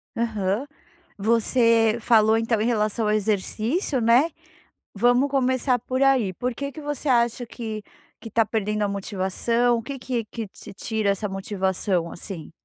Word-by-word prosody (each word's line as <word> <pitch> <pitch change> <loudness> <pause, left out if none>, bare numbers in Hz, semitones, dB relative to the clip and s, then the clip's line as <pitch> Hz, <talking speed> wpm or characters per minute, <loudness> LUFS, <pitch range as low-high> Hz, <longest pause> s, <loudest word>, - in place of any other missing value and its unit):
Aham. 215 0 -1 0.5
Você 230 +1 +3
falou 220 -1 +4
então 225 -1 0
em 220 - +1
relação 215 -1 0
ao 210 - +2
exercício, 220 - 0
né? 240 +8 +4 0.6
Vamos 245 +6 +3
começar 260 -1 +1
por 255 +3 -2
aí. 260 -8 +3
Por 250 +3 -3
que 280 +2 -5
que 310 - -9
você 295 0 -3
acha 240 -1 +2
que 220 -3 -6 0.4
que 225 - -8
está 225 +1 +2
perdendo 210 -1 -1
a 205 - +1
motivação? 200 +5 0
O 230 - -3
que 270 +3 -6
que 245 -2 -3
que 220 0 -6
te - - -12
tira 215 0 -1
essa 205 +1 -1
motivação, 190 -2 -1
assim? 170 -3 -7
225 Hz, 155 wpm, -24 LUFS, 210-245 Hz, 0.6 s, falou